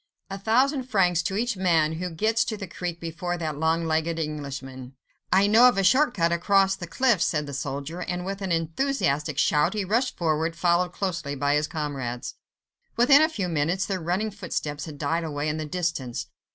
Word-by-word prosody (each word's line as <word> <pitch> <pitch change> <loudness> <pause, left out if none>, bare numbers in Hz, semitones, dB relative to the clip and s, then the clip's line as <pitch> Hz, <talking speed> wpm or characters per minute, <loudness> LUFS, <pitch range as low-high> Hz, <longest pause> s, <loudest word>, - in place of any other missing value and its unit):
A 195 - -5
thousand 255 +6 +2
francs 180 -6 +3
to 190 +3 -3
each 235 0 0
man 165 -4 +2
who 180 0 -3
gets 220 +7 +1
to 215 - -3
that 195 -4 -8
creek 175 -2 -4
before 175 +1 -4
that 155 -4 -4
long 165 +1 +1
legged 160 +1 0
Englishman." 135 -4 -6 0.4
"I 190 +2 +5
know 225 +4 +7
a 195 -6 +2
short 255 +7 +4
cut 170 -3 +2
across 195 +2 +3
the 180 -3 -7
cliffs," 230 -1 +2
said 150 -2 0
the 140 - -7
soldier, 140 +5 -4
and 180 0 -3
with 195 +1 -4
an 190 -2 -3
enthusiastic 165 - 0
shout, 150 +8 +2
he 205 -2 -1
rushed 235 +7 0
forward, 160 0 0
followed 175 +1 +2
closely 170 -7 -3
by 145 +1 +1
his 150 +1 +1
comrades. 140 -7 -4 0.6
Within 275 +5 +6
a 315 - +4
few 200 - -3
minutes 170 +4 0
their 190 -3 -3
running 185 +6 -1
footsteps 160 -7 -4
had 155 -3 -9
died 160 +4 -1
away 150 -2 -3
in 150 +1 -1
the 155 -1 -4
distance. 140 -7 -3
170 Hz, 190 wpm, -25 LUFS, 150-195 Hz, 0.6 s, know